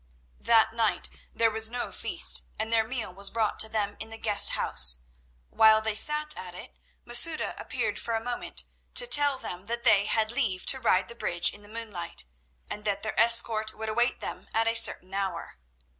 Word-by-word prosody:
That 225 -1 +2
night 225 -2 -1 0.2
there 230 -1 +1
was 220 0 +5
no 245 +1 -5
feast, - - +2 0.2
and 220 +1 -4
their 225 -1 +1
meal 230 -6 -5
was 200 +1 -5
brought 225 -2 -3
to 220 - +4
them 205 -2 -3
in 220 - -7
the 225 - -8
guest 210 -2 +3
house. - - +3 0.5
While 220 0 +4
they 220 0 -3
sat 300 +6 +3
at 180 -1 -9
it - - -12 0.3
Masouda 240 +7 +2
appeared - - -4
for 230 - -4
a 225 - -4
moment 245 0 -3 0.3
to - - +6
tell 290 - +4
them 185 -5 -8
that 235 +1 -4
they 205 -3 +3
had 220 0 0
leave 220 -8 -2
to 265 - +3
ride 185 -6 0
the - - -8
bridge 175 -7 -1
in 205 - -13
the 205 - -17
moonlight, 210 - -7 0.4
and 210 - -8
that 200 -1 -3
their 215 - -3
escort 230 -2 +4
would 220 0 -6
await 240 +3 -1
them - - -7
at 225 0 0
a 230 - +1
certain 190 -4 +1
hour. 195 - -5
220 Hz, 195 wpm, -26 LUFS, 205-235 Hz, 0.5 s, to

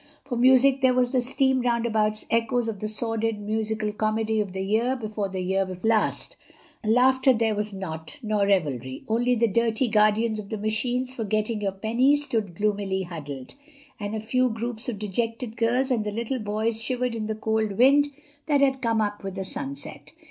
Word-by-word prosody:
For 265 -3 -3
music 260 +2 +5
there 255 -1 +4
was 250 -1 +2
the 255 -2 +2
steam 265 +1 +2
roundabout's 225 -3 0
echoes 230 +1 +1
of 215 -3 -4
the 215 - -3
sordid 225 0 -1
musical 215 0 -2
comedy 220 +1 0
of 200 -3 -4
the 190 +1 -3
year 225 +6 +1
before 215 -4 -3
the 190 -1 -4
year 190 +2 +1
before 185 +3 -3
last—laughter 250 +3 +1
there 225 -2 +1
was 210 0 -2
not—nor 200 - -3
revelry—only 190 - 0
the 235 0 +3
dirty 230 +3 +1
guardians 215 +1 +2
of 200 -1 -8
the 220 - -3
machines 245 +5 -1
for 235 - -3
getting 215 +1 -1
your 200 -1 0
pennies 245 +9 +2
stood 215 -10 -2
gloomily 200 -1 0
huddled, 145 -7 -7 0.5
and 205 +1 -4
a - - -2
few 255 +4 +1
groups 230 +1 -3
of 225 - -4
dejected 225 +3 -3
girls 245 +4 +1
and 230 -4 +1
little 235 +5 -2
boys 220 +1 -1
shivered 250 +1 -1
in 220 -2 -3
the 220 - -2
cold 220 -1 -1
wind 275 +7 +5 0.4
that 290 -2 +3
had 265 -1 +2
come 230 -3 +1
up 205 -1 -2
with 195 -1 -5
the 190 -1 -4
sunset. 140 -4 -7
220 Hz, 175 wpm, -25 LUFS, 205-245 Hz, 0.5 s, music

